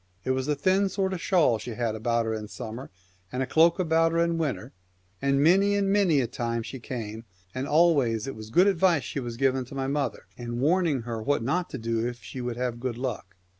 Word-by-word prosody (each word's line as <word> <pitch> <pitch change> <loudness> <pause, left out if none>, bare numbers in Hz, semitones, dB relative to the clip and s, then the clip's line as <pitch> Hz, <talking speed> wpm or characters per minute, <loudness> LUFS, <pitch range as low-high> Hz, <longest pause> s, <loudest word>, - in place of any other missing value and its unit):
It 130 - 0
was 130 +1 -1
a 150 - +1
thin 190 +7 +2
sort 190 0 -1
of 180 - -4
shawl 155 - +3
she 120 -1 -6
had 115 -2 -1
about 115 +1 0
her 110 - -1
in 110 -1 -5
summer, 115 +4 -7 0.4
and 125 +1 -1
a - - -1
cloak 165 +5 +4
about 165 -2 +2
her - - +1
in 170 0 +1
winter; 135 -5 -3 0.5
and 140 0 +2
many 195 +5 +4
and 200 -1 +1
many 185 -8 +3
a - - 0
time 115 0 -3
she 130 - -7
came, 115 -2 -6 0.3
and 130 +2 -3
always 145 -9 +3
it 135 - -5
was 110 0 -9
good 175 +11 +5
advice 180 -5 +3
she - - -4
was 120 -3 -5
giving 135 0 +1
to 135 - -11
my 135 -1 -2
mother, 140 -2 -2
and 120 0 -5
warning 155 -2 +2
her 115 -1 -4
what 140 +1 0
not 175 +8 -1
to - - -5
do 115 -1 -1
if 120 -1 -5
she 130 - -7
would 120 -1 -4
have 125 -1 -2
good 120 -1 -3
luck. 120 -7 -5
135 Hz, 235 wpm, -27 LUFS, 115-165 Hz, 0.5 s, good